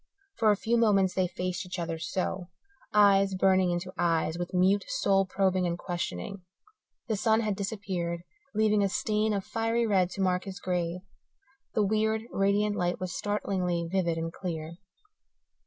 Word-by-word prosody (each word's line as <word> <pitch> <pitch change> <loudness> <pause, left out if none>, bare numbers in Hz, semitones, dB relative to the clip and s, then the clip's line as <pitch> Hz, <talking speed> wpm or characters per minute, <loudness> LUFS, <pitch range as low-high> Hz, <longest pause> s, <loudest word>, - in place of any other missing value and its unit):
For 220 - +4
a 205 - +4
few 230 +3 +1
moments 195 -5 +3
they 185 -1 +1
faced 180 +1 -3
each 180 0 -6
other 165 -1 -3
so, 180 +2 -3 0.4
eyes 195 -2 +5
burning 185 -1 +3
into 175 +2 -3
eyes 165 -2 +1
with 175 0 -4
mute 190 +2 +3
soul 195 -7 +2
probing 185 -2 +1
and 170 0 -2
questioning. 175 - -4 0.7
The 220 - 0
sun 220 +2 +2
had 210 -3 -1
disappeared, 190 -4 -3 0.3
leaving 215 -1 +3
a 195 - +2
stain 215 +4 0
of 200 -2 -1
fiery 230 +1 0
red 190 -5 +2
to 200 - -3
mark 180 -1 +1
his 195 0 -7
grave; 180 -1 -2 0.7
the 215 - +3
weird, 220 +1 +1
radiant 205 +1 +2
light 175 -3 -1
was 185 -2 -4
startlingly 185 -4 -1
vivid 175 -4 +1
and 165 0 -3
clear. 165 -2 -5
190 Hz, 160 wpm, -29 LUFS, 175-205 Hz, 0.7 s, eyes